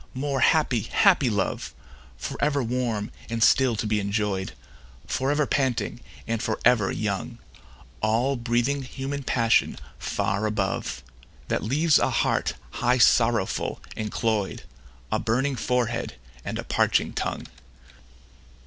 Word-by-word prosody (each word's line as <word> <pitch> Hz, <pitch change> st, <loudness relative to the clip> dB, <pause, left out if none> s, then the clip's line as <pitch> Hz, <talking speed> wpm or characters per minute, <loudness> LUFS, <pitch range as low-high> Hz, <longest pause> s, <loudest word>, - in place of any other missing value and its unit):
more 140 Hz, +1 st, -1 dB
happy, 145 Hz, -6 st, +3 dB
happy 160 Hz, -, +3 dB
love! 100 Hz, -3 st, -2 dB, 0.4 s
For -, -, -5 dB
ever 145 Hz, -2 st, +2 dB
warm 115 Hz, -3 st, -2 dB, 0.2 s
and 115 Hz, -1 st, 0 dB
still 130 Hz, -1 st, +4 dB
to 110 Hz, -, -3 dB
be 105 Hz, 0 st, +1 dB
enjoy'd, 100 Hz, -, -1 dB, 0.5 s
For 130 Hz, +1 st, -1 dB
ever 145 Hz, +1 st, +2 dB
panting, 130 Hz, -4 st, 0 dB, 0.3 s
and 115 Hz, -1 st, -2 dB
for 110 Hz, -, -2 dB
ever 115 Hz, -5 st, +4 dB
young; 110 Hz, +3 st, -3 dB, 0.6 s
All 115 Hz, +6 st, +2 dB
breathing 120 Hz, +3 st, 0 dB
human 135 Hz, +2 st, -5 dB
passion 115 Hz, -3 st, +2 dB, 0.2 s
far 100 Hz, +3 st, -1 dB
above, 100 Hz, -, -2 dB, 0.5 s
That -, -, 0 dB
leaves 150 Hz, +8 st, +3 dB
a -, -, +2 dB
heart -, -, 0 dB, 0.3 s
high 125 Hz, +1 st, +3 dB
sorrowful 115 Hz, -4 st, +3 dB, 0.2 s
and 110 Hz, -1 st, -4 dB
cloy'd, 110 Hz, -4 st, -1 dB, 0.5 s
A 110 Hz, -, +1 dB
burning 130 Hz, +6 st, 0 dB
forehead, 120 Hz, -, -1 dB, 0.3 s
and -, -, -4 dB
a -, -, -4 dB
parching -, -, +1 dB
tongue. -, -, -3 dB
120 Hz, 130 wpm, -25 LUFS, 110-130 Hz, 0.6 s, still